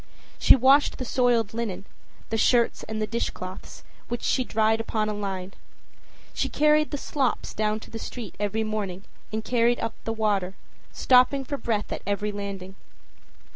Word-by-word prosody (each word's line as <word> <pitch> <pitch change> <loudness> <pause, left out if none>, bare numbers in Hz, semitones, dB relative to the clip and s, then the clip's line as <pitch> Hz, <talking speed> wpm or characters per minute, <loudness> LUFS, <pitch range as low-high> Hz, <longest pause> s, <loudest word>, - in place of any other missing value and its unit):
She - - +7
washed 270 +3 +4
the 255 - -4
soiled 235 -4 +2
linen, 220 -4 -3 0.5
the 225 - +1
shirts 235 +1 +3
and 220 0 -5
the 215 - +1
dishcloths, 195 -4 -5 0.2
which 240 0 -4
she 255 - +2
dried 220 -1 +2
upon 215 -1 -1
a - - -1
line; 195 -2 -4 0.8
she - - -1
carried 300 0 +3
the 290 - -3
slops 270 -2 -1
down 215 0 0
to - - -13
the 225 - -6
street 225 -3 -7
every 210 +2 0
morning 205 -4 -3 0.3
and 220 0 -3
carried 240 0 +2
up 225 - -2
the 225 - -2
water, 200 -4 0 0.4
stopping 255 +2 +4
for 285 +2 -4
breath 220 -5 -2
at - - -3
every 205 +1 -1
landing. 200 -2 -6
220 Hz, 165 wpm, -26 LUFS, 205-245 Hz, 0.8 s, She